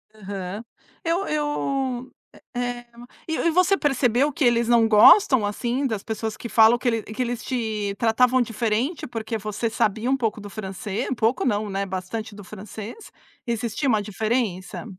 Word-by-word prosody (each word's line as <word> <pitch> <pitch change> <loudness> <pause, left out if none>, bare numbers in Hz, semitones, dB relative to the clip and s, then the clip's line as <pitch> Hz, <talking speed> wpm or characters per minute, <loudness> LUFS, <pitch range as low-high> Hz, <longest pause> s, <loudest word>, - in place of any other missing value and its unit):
Aham. 195 0 -6 0.4
Eu 340 +4 0
eu, 275 -4 -2 0.4
eh, 245 0 -3 0.4
e 320 - -1
e 335 - +2
você 365 +3 +3
percebeu 270 -1 +2
que 285 - -2
eles 235 -1 +3
não 235 -1 +5
gostam, 225 - +7
assim, 240 +6 -1
das 220 -5 -2
pessoas 220 -1 -4
que 235 - -8
falam, 225 +1 +6
que 250 - -3
ele 225 -2 +1
que 215 +5 -5
eles 245 -1 -2
te 215 -5 -2
tratavam 250 +3 +3
diferente 235 +6 -1
porque 225 -1 -4
você 215 +2 -3
sabia 225 +2 0
um 270 - +3
pouco 225 -4 -2
do 205 - -8
francês, 205 +2 -4
pouco 230 +3 +1
não, 210 -3 0
né, 195 0 -2
bastante 190 +4 -5
do 205 - -10
francês, 215 - -9 0.4
existia 235 +4 -2
uma 220 -4 +3
diferença? 205 -4 -2
225 Hz, 160 wpm, -24 LUFS, 210-255 Hz, 0.4 s, gostam